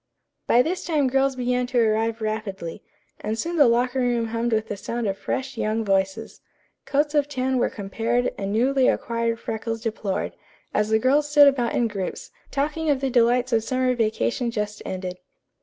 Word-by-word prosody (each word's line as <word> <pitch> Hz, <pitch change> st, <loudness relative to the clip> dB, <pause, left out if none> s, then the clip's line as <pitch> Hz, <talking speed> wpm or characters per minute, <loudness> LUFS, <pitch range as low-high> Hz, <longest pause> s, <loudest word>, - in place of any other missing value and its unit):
By 245 Hz, -, +5 dB
this 360 Hz, +4 st, -2 dB
time 300 Hz, -5 st, +1 dB
girls 270 Hz, +1 st, +2 dB
began 250 Hz, 0 st, 0 dB
to 250 Hz, -1 st, +1 dB
arrive 225 Hz, 0 st, +1 dB
rapidly, 210 Hz, -4 st, -4 dB, 0.4 s
and 215 Hz, +1 st, -3 dB
soon 340 Hz, +6 st, -2 dB
the 290 Hz, -4 st, +7 dB
locker 245 Hz, +2 st, +2 dB
room 240 Hz, -2 st, +1 dB
hummed 230 Hz, +1 st, -1 dB
with 220 Hz, 0 st, 0 dB
the 210 Hz, -, -3 dB
sound 230 Hz, +4 st, -4 dB
of 195 Hz, -2 st, 0 dB
fresh, 265 Hz, +4 st, -4 dB
young 220 Hz, +1 st, 0 dB
voices. 195 Hz, -1 st, -1 dB, 0.5 s
Coats 290 Hz, +1 st, +1 dB
of 290 Hz, -1 st, +2 dB
tan 260 Hz, -2 st, 0 dB
were -, -, +2 dB
compared 230 Hz, +4 st, -1 dB
and 195 Hz, 0 st, -4 dB
newly 255 Hz, +4 st, +3 dB
acquired 230 Hz, 0 st, 0 dB
freckles 225 Hz, +1 st, -4 dB
deplored, 215 Hz, -4 st, -2 dB, 0.4 s
as 210 Hz, 0 st, +1 dB
the 220 Hz, -, +4 dB
girls 280 Hz, +6 st, +2 dB
stood 295 Hz, -1 st, +7 dB
about 250 Hz, -4 st, +1 dB
in 235 Hz, -, +2 dB
groups, 200 Hz, -4 st, -5 dB, 0.2 s
talking 300 Hz, +3 st, -1 dB
of 280 Hz, -2 st, +2 dB
the 270 Hz, -1 st, -1 dB
delights 245 Hz, +1 st, +3 dB
of -, -, +6 dB
the -, -, -1 dB
summer 255 Hz, 0 st, +1 dB
vacation 220 Hz, -, 0 dB
just 210 Hz, -2 st, -3 dB
ended. 185 Hz, -1 st, -5 dB
235 Hz, 185 wpm, -24 LUFS, 215-265 Hz, 0.5 s, the